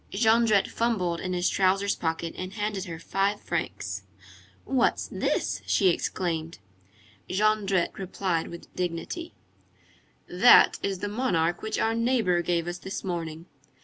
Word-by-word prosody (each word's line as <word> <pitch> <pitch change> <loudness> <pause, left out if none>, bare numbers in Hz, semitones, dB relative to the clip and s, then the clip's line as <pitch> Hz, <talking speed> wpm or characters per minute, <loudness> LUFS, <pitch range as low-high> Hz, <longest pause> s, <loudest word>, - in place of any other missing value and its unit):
Jondrette 220 -1 +3
fumbled 185 -8 -1
in 185 -1 -3
his 180 0 +1
trousers 195 +1 +2
pocket 165 0 -3
and 185 +1 -6
handed 205 -2 -3
her 170 -3 -6
five 195 +5 -1
francs. 105 - -3 0.6
"What's 260 -3 +1
this?" - - -1
she 190 - +4
exclaimed. 165 -2 -2 0.7
Jondrette 200 -2 +1
replied 185 -3 -2
with 170 - -11
dignity:— 180 - -4 0.9
"That - - +6
is 195 -2 -2
the 205 - -1
monarch 190 -7 0
which 220 0 -3
our 225 - +1
neighbor 230 -7 +2
gave 175 -1 -1
us 175 0 -4
this 190 - -6
morning." 165 -3 -4
185 Hz, 130 wpm, -27 LUFS, 170-210 Hz, 0.9 s, That